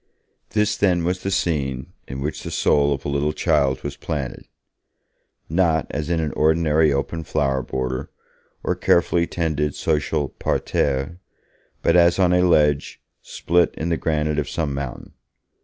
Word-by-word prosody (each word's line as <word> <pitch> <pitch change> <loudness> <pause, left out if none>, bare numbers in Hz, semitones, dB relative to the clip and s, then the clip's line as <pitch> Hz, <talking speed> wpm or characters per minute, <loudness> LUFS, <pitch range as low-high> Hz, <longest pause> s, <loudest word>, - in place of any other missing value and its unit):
This, 105 -1 +1
then, 90 -4 +2
was 90 +2 -1
the 95 - -2
scene 70 -9 -1
in 65 +1 -6
which 75 +3 -3
the - - -6
soul 70 -1 +2
of 70 -1 -3
a - - -1
little 70 +1 0
child 70 -6 +1
was 70 0 -4
planted, 70 -6 -5 1.0
not 80 -1 +2
as 75 +2 -3
in 85 -1 +1
an 80 -2 -1
ordinary 80 -1 +3
open 75 +4 -2
flower 70 -4 0
border 65 0 -3 0.5
or - - +1
carefully 85 0 +2
tended 75 -4 -1
social 75 -3 0
parterre, 70 +5 -1 0.6
but 85 - +3
as 85 -1 +5
on 90 -2 +3
a 90 - +4
ledge, 75 -5 +2 0.2
split 85 +1 +1
in 80 - -2
the 85 - +2
granite 75 -1 0
of 75 -1 -3
some 80 -4 -2
mountain. 70 -2 -6
75 Hz, 155 wpm, -22 LUFS, 70-85 Hz, 1.0 s, as